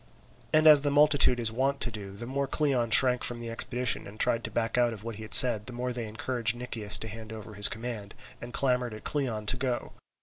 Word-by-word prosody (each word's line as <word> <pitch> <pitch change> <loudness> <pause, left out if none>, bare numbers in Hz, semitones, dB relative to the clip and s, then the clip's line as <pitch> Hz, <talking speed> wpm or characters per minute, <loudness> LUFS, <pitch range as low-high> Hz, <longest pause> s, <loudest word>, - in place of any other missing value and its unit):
And 155 0 +3
as 150 -2 +8
the 145 - -1
multitude 145 -3 +3
is 115 -2 0
wont 135 +4 -1
to 120 - 0
do, 100 -3 -8
the 120 - -7
more 140 +2 -3
Cleon 135 -5 -1
shrank 125 +2 +5
from 120 -1 0
the 115 -1 -7
expedition 125 0 -1
and 105 +2 -13
tried 120 -1 0
to - - -3
back 115 -1 -2
out 120 -1 +1
of 105 -2 -11
what 115 -2 -7
he - - -9
had 110 - +4
said, 110 -5 +4
the 125 - -6
more 125 +1 -4
they 120 -2 -5
encouraged 115 +1 -3
Nicias 115 -4 -1
to 110 - -5
hand 110 0 -8
over 110 0 -10
his 100 0 +6
command, 110 -3 -7 0.3
and 120 - -8
clamoured 125 -3 -1
at 110 - -12
Cleon 120 -8 -3
to 125 - +3
go. 125 -2 -4
120 Hz, 240 wpm, -27 LUFS, 110-130 Hz, 0.3 s, as